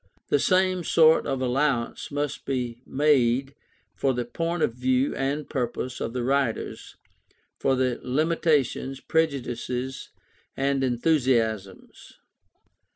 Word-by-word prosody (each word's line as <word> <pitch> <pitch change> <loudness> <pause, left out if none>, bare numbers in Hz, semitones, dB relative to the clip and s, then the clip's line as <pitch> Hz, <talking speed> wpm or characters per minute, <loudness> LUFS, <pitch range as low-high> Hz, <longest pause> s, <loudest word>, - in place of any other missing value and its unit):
The 145 - +3
same 185 +2 +2
sort 160 0 +4
of 135 -2 -1
allowance 130 -1 0
must 145 -1 -3
be 125 -3 -3
made 135 -2 +2 0.4
for 130 +7 0
the 120 -1 -2
point 165 +6 -2
of 115 - +1
view 130 +2 +1
and 140 +2 -2
purpose 125 -1 -3
of - - -3
the 125 -1 -2
writers, 135 -2 -1 0.6
for 135 - +2
their 130 -1 0
limitations, 145 -2 0
prejudices, 130 -5 -2 0.5
and 135 0 +1
enthusiasms. 120 - -1
135 Hz, 110 wpm, -25 LUFS, 125-145 Hz, 0.6 s, sort